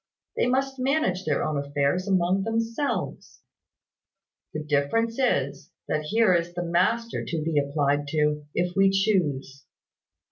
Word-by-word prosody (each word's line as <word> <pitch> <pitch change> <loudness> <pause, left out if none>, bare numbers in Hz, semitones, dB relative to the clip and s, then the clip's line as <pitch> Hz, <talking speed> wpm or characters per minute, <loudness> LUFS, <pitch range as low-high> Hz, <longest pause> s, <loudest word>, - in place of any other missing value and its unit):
They - - +1
must 270 +1 0
manage 255 -9 0
their 150 - 0
own 150 -2 -1
affairs 145 +6 0
among 185 0 +2
themselves. 230 +6 -3 1.1
The 155 - -4
difference 150 - 0
is, 140 - 0 0.2
that 155 0 -1
here 215 +2 +3
is 175 0 -1
the 175 - -2
master 215 +8 0
to 160 -2 -3
be 155 -2 +1
applied 145 0 0
to, 150 0 0
if 175 +1 -1
we 195 0 +5
choose. 160 -10 0
175 Hz, 135 wpm, -26 LUFS, 145-225 Hz, 1.1 s, we